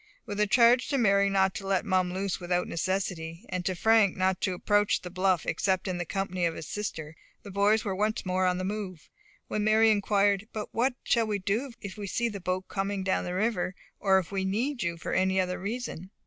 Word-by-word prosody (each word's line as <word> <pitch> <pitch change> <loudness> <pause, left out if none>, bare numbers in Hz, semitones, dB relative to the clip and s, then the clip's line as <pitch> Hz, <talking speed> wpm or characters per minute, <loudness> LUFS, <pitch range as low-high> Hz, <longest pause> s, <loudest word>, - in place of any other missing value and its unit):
With 205 0 -5
a 210 - +3
charge 240 +4 +5
to 280 - 0
Mary 200 -4 +4
not 190 -1 +2
to 195 - -6
let 195 +1 +1
Mum 185 -3 +1
loose 190 0 -2
without 180 0 -1
necessity, 175 0 -3
and 180 -1 -2
to 185 - 0
Frank 220 +1 +4
not 185 0 +1
to 185 -2 0
approach 205 +3 +2
the 180 - -7
bluff 185 -1 +1
except 190 0 0
in 180 -1 -2
the 175 - -2
company 185 -1 -2
of 165 - -4
his - - -7
sister, 160 -7 -5 0.3
the 200 - -9
boys 205 +3 +2
were 195 -2 -1
once 215 +3 -1
more 185 0 +1
on 180 0 +1
the 185 - -3
move, 190 -4 -5 0.4
when 210 - -1
Mary 220 +1 +5
inquired, 205 -1 +2
"But 215 -1 -4
what 245 +2 +1
shall 230 -2 +2
we 210 -1 0
do 215 +7 -2
if 200 -1 -7
we 205 -1 -5
see 235 +4 0
the 200 -3 -7
boat 185 +1 -2
coming 195 0 -2
down 190 0 0
the 180 0 -3
river, 195 -3 0 0.2
or 195 -2 +4
if 185 -1 -2
we 195 -1 -1
need 235 +8 -1
you 170 -2 -1
for - - -5
any 190 0 +2
other 180 -1 -1
reason?" 200 -3 -5
195 Hz, 225 wpm, -28 LUFS, 185-210 Hz, 0.4 s, charge